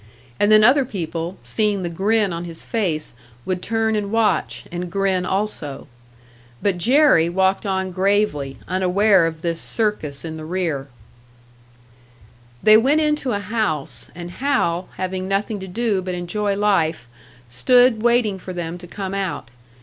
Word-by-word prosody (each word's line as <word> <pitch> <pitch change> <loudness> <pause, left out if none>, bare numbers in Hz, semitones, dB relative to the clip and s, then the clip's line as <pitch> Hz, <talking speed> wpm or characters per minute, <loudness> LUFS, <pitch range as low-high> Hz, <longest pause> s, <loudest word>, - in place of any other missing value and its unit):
And 205 +1 +3
then 215 0 +7
other 265 +5 +6
people, 175 -5 -5
seeing 210 -3 0
the - - -1
grin 200 +3 +1
on 170 +1 -4
his 165 -1 -8
face, 175 - -1 0.3
would 185 -1 -2
turn 225 0 0
and 205 -1 -2
watch, 225 -1 0
and 175 0 -5
grin 190 -2 0
also. 190 -8 -3 0.7
But 195 -3 0
Jerry 245 - +4
walked 190 +3 +1
on 190 -1 -1
gravely, 185 -8 0
unaware 185 0 +3
of 160 +1 -7
this 170 -1 -1
circus 170 -11 -1
in 160 -1 -6
the 155 - -8
rear. 160 -5 -2 1.8
They 215 0 +8
went 275 +7 +3
into 300 -4 0
a 200 - -1
house; 205 -8 -2
and 175 0 -7
Hal, 190 -10 0
having 185 0 -3
nothing 205 +2 -1
to 190 - -7
do 205 0 0
but 185 -1 -4
enjoy 200 +3 -2
life, 170 - +1 0.4
stood 245 - +4
waiting 235 -4 +2
for 185 0 -7
them 175 0 -5
to 175 - -10
come 195 +1 -5
out. 190 -11 -3
190 Hz, 150 wpm, -21 LUFS, 175-215 Hz, 1.8 s, They